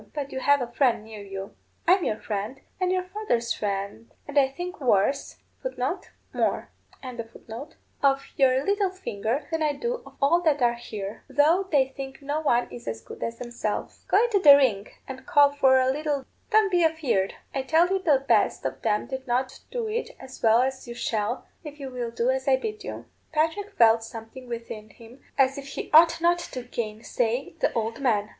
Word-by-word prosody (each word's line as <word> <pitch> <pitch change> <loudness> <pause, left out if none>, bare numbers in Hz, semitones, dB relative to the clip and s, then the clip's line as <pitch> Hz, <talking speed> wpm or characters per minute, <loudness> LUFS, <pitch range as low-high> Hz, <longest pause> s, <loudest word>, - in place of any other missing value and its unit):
But 285 -2 -4
you 265 - -3
have 285 +1 +3
a 240 - -7
friend 240 -4 +2
near 220 -1 -9
you. 195 0 -7 0.3
I'm 365 +1 +5
your 215 - 0
friend, 215 +5 -4 0.2
and 365 -1 +1
your 370 0 +1
father's 365 - -1
friend, 200 +2 -4 0.2
and 290 - -8
I 280 -2 +5
think 355 +6 -7
worse 250 +2 +1 0.3
of - - -4 0.6
your - - 0 2.0
little 400 -1 +2
finger 275 - -3
than 325 0 -1
I 300 -1 +2
do 475 - -3
of - - -15
all 320 +5 +4
that 310 -4 +2
are 240 0 +4
here, 215 -3 -7
though 310 +8 +3
they 270 -3 +3
think 270 -1 -7
no 290 +2 -1
one 245 -5 +2
is 120 -1 -10
as 110 0 -4
good - - -11
as 230 0 -3
themselves. 240 -3 -4
Go 410 - +4
into 460 -4 +2
the 290 -6 +10
ring 220 -8 +2 0.2
and 265 +3 -9
call 290 -5 +6
for 265 -2 +4
a 255 - +3
lilt. 290 -1 -2 0.2
Don't 430 -3 +4
be 350 -1 +3
afeard. 290 -12 +1 0.2
I 270 - 0
tell 320 +6 +3
you 385 0 +1
the 285 -7 +2
best - - +2
of - - -3
them 210 -2 +1
did 265 -1 -6
not 255 +2 -1
do 475 -3 -3
it 450 +2 -3
as 260 0 -11
well 225 +2 +5
as 265 -1 -3
you 235 - -7
shall, 230 0 -2 0.2
if 300 -1 -9
you 270 -2 -6
will 245 -2 -3
do 235 +2 +1
as 265 +1 -2
I 270 - +6
bid 425 +10 -5
you.' - - -7 0.3
Patrick 325 +6 0
felt 225 -1 +5
something 225 +3 -9
within 230 -2 -6
him 235 +4 -15 0.2
as 270 0 +3
if 275 - -9
he 275 - -6
ought 330 +1 +7
not 345 +1 +3
to 255 -7 -6
gainsay 235 +2 -2
the - - +2
old 225 +1 -2
man. 215 -5 +1
265 Hz, 190 wpm, -26 LUFS, 230-320 Hz, 2.0 s, the